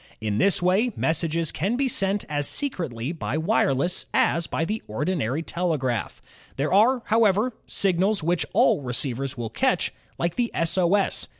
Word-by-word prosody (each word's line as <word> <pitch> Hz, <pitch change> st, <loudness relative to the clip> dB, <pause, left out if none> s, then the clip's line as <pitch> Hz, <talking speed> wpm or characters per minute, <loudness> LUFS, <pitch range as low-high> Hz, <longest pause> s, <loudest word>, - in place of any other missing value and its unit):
In 105 Hz, -1 st, -2 dB
this 195 Hz, -3 st, +3 dB
way, 195 Hz, +7 st, +2 dB
messages 165 Hz, 0 st, 0 dB
can 200 Hz, +8 st, -1 dB
be 270 Hz, +1 st, +1 dB
sent 200 Hz, -4 st, +1 dB
as 145 Hz, -1 st, -1 dB
secretly 160 Hz, -, -2 dB
by 155 Hz, -4 st, -3 dB
wireless 160 Hz, -, +1 dB
as 170 Hz, 0 st, +2 dB
by 165 Hz, -, -1 dB
the 215 Hz, +5 st, -3 dB
ordinary 145 Hz, +3 st, -2 dB
telegraph. 155 Hz, -10 st, -2 dB, 0.3 s
There 145 Hz, +5 st, -1 dB
are, 235 Hz, +5 st, +4 dB
however, 220 Hz, +2 st, +2 dB
signals 195 Hz, 0 st, +1 dB
which 170 Hz, +1 st, +1 dB
all -, -, +3 dB
receivers 130 Hz, +1 st, -3 dB
will 115 Hz, -2 st, -4 dB
catch, -, -, 0 dB, 0.2 s
like 170 Hz, 0 st, -2 dB
the 240 Hz, -1 st, +1 dB
S. 165 Hz, 0 st, +1 dB
O. 185 Hz, 0 st, +3 dB
S. 200 Hz, -, 0 dB
170 Hz, 160 wpm, -24 LUFS, 140-200 Hz, 0.3 s, are